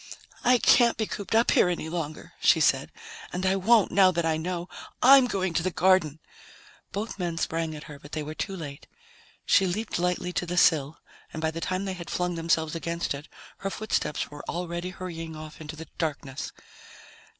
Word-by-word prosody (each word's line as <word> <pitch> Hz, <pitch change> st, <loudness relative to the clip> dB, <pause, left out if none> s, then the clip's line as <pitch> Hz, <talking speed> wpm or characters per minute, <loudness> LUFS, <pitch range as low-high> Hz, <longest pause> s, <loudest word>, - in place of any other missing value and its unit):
"I 250 Hz, +1 st, +5 dB
can't 235 Hz, 0 st, +5 dB
be 220 Hz, -, 0 dB
cooped 205 Hz, +1 st, -4 dB
up 230 Hz, +1 st, +4 dB
here 180 Hz, -, +4 dB
any 175 Hz, -3 st, -2 dB
longer," 160 Hz, -2 st, -5 dB
she -, -, +5 dB
said. -, -, +2 dB, 0.4 s
"And 185 Hz, +1 st, -3 dB
I 190 Hz, +1 st, +3 dB
won't, 210 Hz, +2 st, +4 dB
now 190 Hz, 0 st, +6 dB
that 170 Hz, -2 st, 0 dB
I 160 Hz, -1 st, +2 dB
know. 175 Hz, +2 st, -3 dB, 0.4 s
I'm 265 Hz, 0 st, +8 dB
going 190 Hz, -6 st, -1 dB
to 165 Hz, -, +1 dB
the 185 Hz, -, 0 dB
garden." 175 Hz, -4 st, +3 dB, 0.7 s
Both 205 Hz, +1 st, -4 dB
men 170 Hz, -2 st, -2 dB
sprang 165 Hz, -1 st, -2 dB
at 150 Hz, -, -8 dB
her, 145 Hz, -1 st, -10 dB
but 145 Hz, +1 st, -14 dB
they 155 Hz, -, -2 dB
were 155 Hz, +1 st, -6 dB
too 195 Hz, +4 st, -4 dB
late. 145 Hz, -4 st, -8 dB, 0.6 s
She 195 Hz, -, +4 dB
leaped 205 Hz, +1 st, -2 dB
lightly 180 Hz, 0 st, -1 dB
to 180 Hz, -, -1 dB
the 175 Hz, +1 st, -3 dB
sill, 155 Hz, -3 st, +4 dB, 0.3 s
and 160 Hz, -, -6 dB
by 160 Hz, 0 st, 0 dB
the 165 Hz, +1 st, -6 dB
time 185 Hz, +3 st, -2 dB
they 190 Hz, -, -2 dB
had 175 Hz, -2 st, -8 dB
flung 180 Hz, 0 st, -1 dB
themselves 165 Hz, -1 st, 0 dB
against 170 Hz, 0 st, -2 dB
it, 140 Hz, +2 st, -8 dB, 0.3 s
her 195 Hz, -, -2 dB
footsteps 195 Hz, -9 st, -2 dB
were 145 Hz, 0 st, -9 dB
already 175 Hz, +1 st, -3 dB
hurrying 165 Hz, -3 st, -7 dB
off 155 Hz, 0 st, -10 dB
into 155 Hz, 0 st, -7 dB
the 160 Hz, +1 st, -8 dB
darkness. 140 Hz, -4 st, -3 dB
170 Hz, 195 wpm, -27 LUFS, 160-190 Hz, 0.7 s, I'm